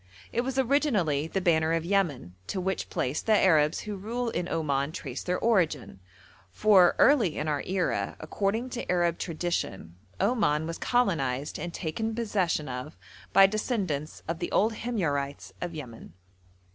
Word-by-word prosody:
It 235 - +2
was 265 +1 -3
originally 230 - +2
the 190 +3 -2
banner 160 -3 +2
of 165 0 0
Yemen, 170 - 0
to 190 - -2
which 190 +1 -2
place 130 +4 -1
the 220 -1 +3
Arabs 155 -5 +3
who 210 -1 -5
rule 230 +5 -3
in 175 +1 -3
Oman 140 -2 0
trace - - -5
their 180 0 -1
origin; 170 - 0 0.5
for 195 -5 +5
early 235 - +4
in 150 - -2
our 150 -2 0
era, 185 -1 -1
according 220 +6 -2
to 245 -7 -3
Arab 175 -2 +1
tradition, 160 - -3 0.2
Oman 200 -9 +2
was 165 0 -5
colonised 150 - 0
and 175 +3 -4
taken 220 +8 -3
possession 195 -9 0
of 130 +4 -6 0.3
by 195 - +8
descendants 195 - -2
of 165 +1 -3
the - - -3
old 220 +3 +3
Himyarites 155 - -2
of 175 -2 -4
Yemen. 120 - -9
175 Hz, 155 wpm, -28 LUFS, 150-215 Hz, 0.5 s, by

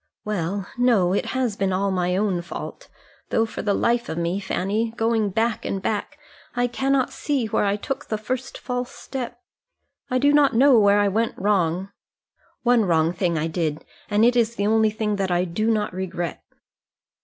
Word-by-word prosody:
"Well, 195 -1 -2
no, 215 -8 +3
it 200 - 0
has 255 -5 -1
been 195 -1 0
all 195 +1 0
my 180 0 0
own 195 -4 0
fault; 170 - -8 0.4
though 225 - +2
for 220 - -6
the 205 -2 +1
life 235 0 +1
of 160 - -4
me, 170 +3 -1
Fanny, 210 +4 -1
going 225 -2 +1
back 225 +3 0
and 195 - -2
back, 210 +9 -3 0.4
I 245 0 +2
cannot 265 +2 0
see 280 -5 -1
where 215 - 0
I 200 0 +2
took 270 +7 -5
the 215 - -1
first 255 +5 -4
false 250 -1 -3
step. 245 -3 -6 0.7
I 255 - +1
do 285 +3 +4
not 285 -4 +4
know 260 0 +6
where 205 -1 +5
I 205 - +3
went 225 +4 0
wrong. 190 -2 +1 0.7
One 240 -3 +4
wrong 165 -1 +2
thing 175 -3 0
I 155 - 0
did, 160 -2 -2 0.2
and 210 +2 +4
it 245 +1 +4
is 235 -1 +2
the 200 - -1
only 220 +1 +4
thing 210 -1 -2
that 195 -1 -1
I 175 0 +2
do 215 +6 -1
not 215 -4 0
regret." 180 -2 -4
210 Hz, 190 wpm, -23 LUFS, 185-235 Hz, 0.7 s, know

